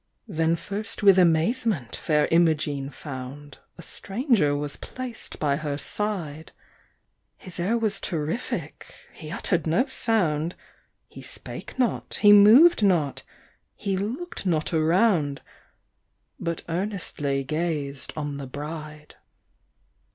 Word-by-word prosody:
Then 165 -4 +1
first 210 +6 -5
with 195 -2 +7
amazement 170 - +2
Fair 150 -1 +1
Imogene 155 -4 +2
found 140 0 -9 0.2
A 170 - -10
stranger 200 - 0
was 145 0 -3
placed 255 -3 -7
by 140 -2 +1
her 145 -2 -3
side; 160 -1 -3 0.9
His 185 -1 -9
air 200 +7 +1
was 220 -3 0
terrific, 165 +5 -4 0.2
he 155 -3 -10
uttered 170 -2 0
no 195 +11 +3
sound 180 - 0 0.5
He - - -12
spake - - -6
not, 250 -3 -1
he 205 -1 +7
moved 225 +11 +8
not 170 -9 +2 0.5
he 200 -2 -2
looked 240 - -4
not 165 -3 0
around, 160 -2 +2 1.0
But 170 -1 -3
earnestly 165 -6 -2
gazed 150 -2 -3
on 145 -2 -3
the 140 -1 -6
bride. 150 +2 -8
165 Hz, 115 wpm, -25 LUFS, 150-205 Hz, 1.0 s, moved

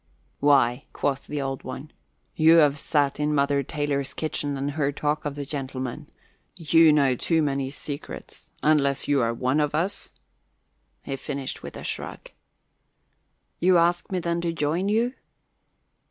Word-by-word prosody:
"Why," 135 -3 +3
quoth 140 -1 -2
the 150 - -3
Old 135 -1 -3
One, 135 +3 -7 0.4
"you 160 +1 +6
have 150 -3 +5
sat 145 -2 +1
in 150 0 +1
Mother 140 0 +2
Taylor's 140 -1 -2
kitchen 145 -2 -2
and 140 +1 -2
heard 145 -1 -1
talk 150 +1 -1
of 145 -1 -3
the 145 -1 -5
gentlemen. 130 -3 -5 0.5
You 165 -1 +5
know 140 -3 +4
too 160 +5 +1
many 140 -2 -1
secrets. 145 0 -7
Unless 140 -2 +2
you 145 -2 +3
are 115 0 +1
one 130 +5 0
of 150 0 0
us 185 +6 -2 0.5
" - - -46
He 135 - -4
finished 140 -1 -5
with - - -8
a - - -8
shrug. - - -6 1.3
"You 180 +1 +5
ask 170 +2 +2
me, 185 - 0
then, 170 -1 -1
to 170 -1 -1
join 165 +5 -1
you?" 230 +4 +1
145 Hz, 155 wpm, -25 LUFS, 140-160 Hz, 1.3 s, you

